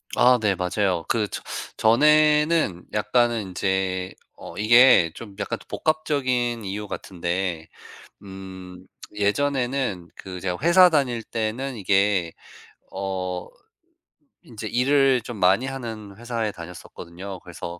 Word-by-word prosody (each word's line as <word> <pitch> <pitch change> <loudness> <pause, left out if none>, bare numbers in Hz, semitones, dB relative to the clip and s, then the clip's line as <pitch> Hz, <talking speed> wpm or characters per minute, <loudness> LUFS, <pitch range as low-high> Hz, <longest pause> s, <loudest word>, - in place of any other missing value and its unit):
아 125 +1 +5
네 100 -3 +2
맞아요. 90 -1 -1
그 110 -3 +1
저 - - -6 0.3
전에는 150 - +3
약간은 120 +1 +1
인제 95 0 -1 0.2
어 - - -10
이게 120 -5 +6
좀 105 -4 -10
약간 110 +3 -3
복합적인 130 -7 -1
이유 100 +2 -5
같은데 85 -3 -4 0.6
음 95 -1 -10 0.3
예전에는 120 -3 -1
그 90 -1 -8
제가 90 -2 -2
회사 180 +3 +6
다닐 125 -8 0
때는 115 +4 -3
이게 95 -3 +1 0.6
어 90 -2 -4 1.0
인제 110 -2 -8
일을 135 +2 +3
좀 115 0 -8
많이 95 +7 +3
하는 115 -6 -7
회사에 115 -2 -3
다녔었거든요. 90 +1 -9
그래서 85 0 -8
105 Hz, 230 characters per minute, -24 LUFS, 95-125 Hz, 1.0 s, 이게